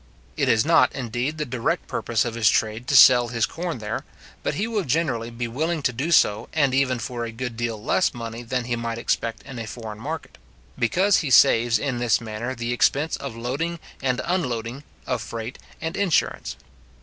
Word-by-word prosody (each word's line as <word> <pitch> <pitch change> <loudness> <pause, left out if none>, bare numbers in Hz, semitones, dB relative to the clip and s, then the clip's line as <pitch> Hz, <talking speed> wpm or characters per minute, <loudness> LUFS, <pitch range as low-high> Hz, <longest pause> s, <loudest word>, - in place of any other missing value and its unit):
It - - +1
is 110 +2 +3
not, 160 -5 +5
indeed, 125 +4 -2
the 150 - -2
direct 125 -3 -2
purpose 115 0 0
of 120 - -3
his 115 -3 +3
trade 110 +3 0
to 140 - +1
sell 125 -2 +8
his 115 -1 +1
corn 170 -3 -4
there; 110 0 -4 0.4
but - - -2
he 200 - 0
will 220 -3 -1
generally 130 -6 0
be 120 0 -4
willing 155 +6 -2
to 125 - +1
do 140 +8 -2
so, 110 -8 +3
and 140 -4 +2
even 130 -1 +2
for 120 +1 -4
a 115 - -4
good 120 +1 -5
deal 115 -2 -2
less 185 - +1
money 115 -1 -6
than 125 +1 -2
he 120 0 -2
might 115 -1 -3
expect 115 -1 -2
in 130 -3 -8
a 115 - -5
foreign 110 -1 -7
market; 155 +6 -6 0.4
because 185 - +3
he 150 - -1
saves 120 -1 +5
in 130 +1 -2
this 120 -3 +2
manner 115 +3 -5
the 120 0 -2
expense 145 +5 +2
of 140 -4 -6
loading 140 +9 -2 0.2
and 130 -2 0
unloading, 125 -8 -2 0.2
of 125 -3 -1
freight 115 +2 -6 0.2
and 160 0 -4
insurance. 200 -5 0
120 Hz, 195 wpm, -24 LUFS, 115-140 Hz, 0.4 s, sell